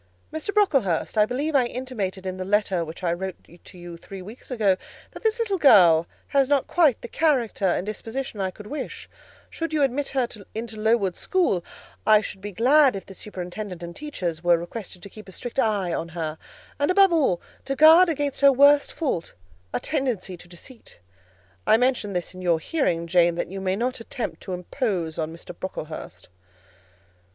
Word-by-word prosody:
"Mr. 315 +6 -3
Brocklehurst, 275 - +1
I 210 -1 +4
believe 285 +6 -2
I 255 -3 +4
intimated 215 -8 -4
in 185 0 -4
the 185 - -3
letter 195 -3 +1
which 165 +3 -9
I 170 -1 +1
wrote 190 +1 -4 0.3
to - - -13
you 175 -1 -9
three 190 +2 -10
weeks 215 +6 -11
ago, 215 -7 +2 0.4
that - - -10
this 445 0 +1
little 420 -5 -1
girl 175 - +6 0.2
has 275 -2 +2
not 285 -2 +3
quite 310 -8 +3
the - - -5
character 255 -9 +1
and 180 +1 0
disposition 225 +1 -5
I 190 - 0
could 205 +3 -12
wish: 285 +7 -6 0.4
should 330 -1 -5
you 300 -2 +2
admit 275 +1 0
her 260 -3 0 0.3
into 225 0 -5
Lowood 215 -4 +2
school, 340 - +1 0.4
I 215 -1 +6
should 195 -2 -7
be 205 +1 -6
glad 265 +6 +4
if 195 - -6
the 195 - -11
superintendent 185 -1 -7
and 170 0 -7
teachers 180 - -4
were 175 -1 +5
requested 180 +1 -7
to 200 - -9
keep 215 -2 -12
a - - -10
strict 245 +6 -5
eye 205 -7 +1
on 165 - -3
her, 160 -2 -4 0.4
and, 285 - +1
above 385 -1 +5
all, 270 - +2 0.3
to 275 - -2
guard 320 +5 +8
against 290 -3 -2
her 280 0 +8
worst 285 +2 +5
fault, 265 - -3 0.4
a 120 - -1
tendency 250 - -2
to 175 - -15
deceit. 180 - -13 0.7
I 220 - +6
mention 245 -5 0
this 180 0 -3
in 185 - -9
your 175 -2 +2
hearing, 170 - 0
Jane, 170 0 +3
that 175 - -3
you 195 0 -5
may 190 0 0
not 250 +4 -2
attempt 230 0 -5
to 190 - -6
impose 180 - -2
on 160 0 -2
Mr. 165 - -10
Brocklehurst." 160 -4 -7
210 Hz, 190 wpm, -24 LUFS, 180-275 Hz, 0.7 s, guard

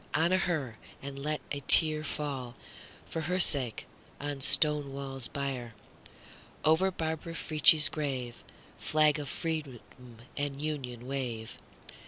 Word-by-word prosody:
Honor 175 +4 +2
to - - 0
her! 145 -10 -3 0.3
and 140 0 -7
let 150 +2 -3
a 145 - -2
tearFall, 145 -4 +2 0.5
for 165 - -4
her 180 +3 -2
sake, 135 -9 +2 0.3
on 145 -1 -5
Stonewall's 140 -3 +3
bier. 130 -5 -5 0.9
Over 160 +5 +4
Barbara 165 -1 -4
Frietchie's 155 -1 +6
grave, 130 -6 -5 0.4
Flag 155 0 +2
of 145 - -6
Freedom 155 -7 -4 0.6
and 145 -1 -3
Union, 130 -6 -5
wave! 125 -5 -5
145 Hz, 115 wpm, -30 LUFS, 135-155 Hz, 0.9 s, Frietchie's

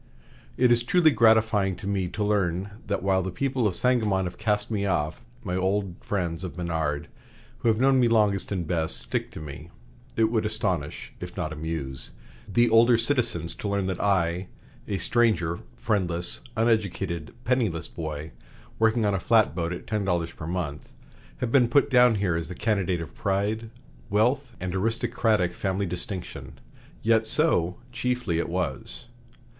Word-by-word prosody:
"It 125 -1 +4
is 120 0 +4
truly 160 +6 +4
gratifying 110 -5 +4
to 95 - -10
me 100 -2 0
to 105 +4 -3
learn 100 -2 0 0.2
that 100 - -1
while 95 -1 +2
the 95 - -3
people 130 +3 0
of 95 - -2
Sangamon 110 -7 +2
have 90 - -6
cast 105 0 0
me 100 -2 0
off, 75 -5 -1 0.2
my 90 - -2
old 95 0 0
friends 90 -4 -2
of 90 -1 -6
Menard, 80 -4 -2 0.5
who - - -1
have 110 -1 +3
known 135 0 +4
me 120 - +4
longest 105 -4 +2
and 90 -4 -1
best, 80 -2 0
stick - - -2
to - - -9
me. 75 +2 -9 0.5
It 110 0 +2
would 110 -2 +1
astonish, 100 -8 -2
if 90 +1 -8
not 80 -4 -2
amuse, 75 -4 -5 0.4
the 120 +5 +4
older 115 +1 +6
citizens 115 - 0
to - - -5
learn 100 -1 0
that 95 -1 -2
I 90 -2 +1 0.4
(a 100 - -1
stranger, 90 -8 +2 0.2
friendless, 85 +6 -1 0.2
uneducated, 100 -8 0
penniless 115 -10 +1
boy, 80 -2 -6 0.5
working 110 0 +3
on 100 - +2
a 95 - 0
flatboat 85 0 +2
at 90 - -6
ten 105 -2 -1
dollars 85 -3 0
per 80 - -8
month) 80 -4 -4 0.5
have 120 -2 -1
been 125 -3 +5
put 140 +4 +3
down 125 -2 +6
here 95 -4 0
as 85 -1 -2
the 90 - -7
candidate 95 -6 0
of 80 - -8
pride, 105 +3 -1 0.4
wealth, 125 +6 +1
and 90 -1 -3
aristocratic 110 -2 +1
family 95 +2 -1
distinction. 85 - -6 0.4
Yet 110 0 +3
so, 90 - +2
chiefly, 120 -8 -1
it - - -2
was. 70 -8 -4
95 Hz, 165 wpm, -26 LUFS, 85-110 Hz, 0.5 s, older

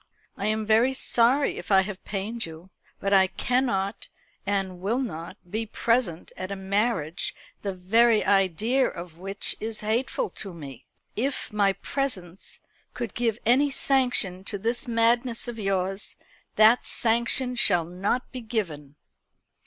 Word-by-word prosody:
I 200 - -2
am 215 0 0
very 230 +5 +4
sorry 255 +2 +2
if - - -8
I 190 -1 +7
have 190 -1 -6
pained 210 +4 -3
you; 165 +3 -12 0.3
but 200 0 0
I 190 -1 +6
cannot 200 -2 -1 0.4
and 195 -3 -1
will 210 +6 0
not 170 -11 -4
be 220 +5 -3
present 230 -7 0
at 185 +1 -5
a - - -2
marriage 190 -4 -1 0.3
the 200 - -2
very 215 +5 +3
idea 205 +7 +3
of 170 -1 -8
which 195 +2 -3
is 220 0 -3
hateful 240 - -1
to 195 -4 -6
me. 135 -6 -10 0.3
If 260 -1 -2
my 200 -2 +3
presence 195 -9 -4 0.3
could 240 -4 -4
give 230 -3 0
any 265 +5 +4
sanction 245 -10 +1
to 205 - -3
this 230 +5 0
madness 235 +1 +2
of 235 -2 -6
yours, 195 0 -1 0.4
that 220 +3 +6
sanction 235 +2 +2
shall 200 -9 +3
not 190 +8 -2
be 255 - -6
given." 165 - -4
210 Hz, 145 wpm, -26 LUFS, 190-240 Hz, 0.4 s, I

